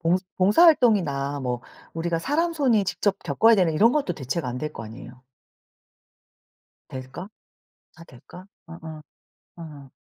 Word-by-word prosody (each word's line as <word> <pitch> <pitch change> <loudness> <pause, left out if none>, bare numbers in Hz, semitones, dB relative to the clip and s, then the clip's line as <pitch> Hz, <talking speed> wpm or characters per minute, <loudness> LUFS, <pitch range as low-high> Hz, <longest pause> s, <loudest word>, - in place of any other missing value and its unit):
봉 165 +2 +2 0.2
봉사 200 - +4
활동이나 170 - +2
뭐 125 -2 -3 0.3
우리가 165 0 -2
사람 325 - 0
손이 255 -10 +2
직접 190 +2 -1
겪어야 200 +10 +3
되는 180 -4 +2
이런 220 +9 +4
것도 280 -11 0
대체가 135 +2 -4
안 125 - -5
될 150 +2 -5
거 115 - -8
아니에요. 125 +3 -12 1.7
될까? 130 +7 -8 0.7
다 165 - -14
될까? 170 +6 -15 0.2
어어. 160 -2 -10 0.6
어. 150 -5 -11
165 Hz, 260 characters per minute, -24 LUFS, 140-205 Hz, 1.7 s, 봉사